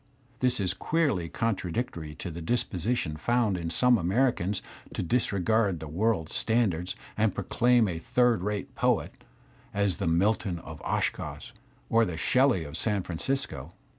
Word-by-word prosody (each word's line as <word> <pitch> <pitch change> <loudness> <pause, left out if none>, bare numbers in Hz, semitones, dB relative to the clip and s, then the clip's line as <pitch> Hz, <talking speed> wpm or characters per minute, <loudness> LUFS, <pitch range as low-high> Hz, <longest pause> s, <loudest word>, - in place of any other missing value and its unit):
This 125 -2 +2
is 95 -2 +1
queerly 140 - 0
contra 105 -5 -1
dictory 80 -8 -4
to 90 - -5
a 85 +1 -7
disposition 95 -4 -1
found 115 +1 +1
in 85 -2 -3
some 125 +7 +4
Americans 100 0 +1 0.3
to - - -1
disr^ard 100 -3 +1
world 85 +2 0
standards 95 -7 0 0.2
and 110 -3 +1
proclaim 120 +3 +3
a 85 -3 -3
third 120 +3 +2
rate 105 +1 -3
poet - - +1 0.6
as 100 -5 +1
the - - -2
Milton 95 +2 +1
of - - -10
Oshkosh - - -2 0.4
or 115 0 +4
the 90 -7 -2
Shelley 130 -3 +3
of 75 +1 -6
San 105 -2 0
Francisco. 85 - -3
100 Hz, 140 wpm, -28 LUFS, 85-120 Hz, 0.6 s, some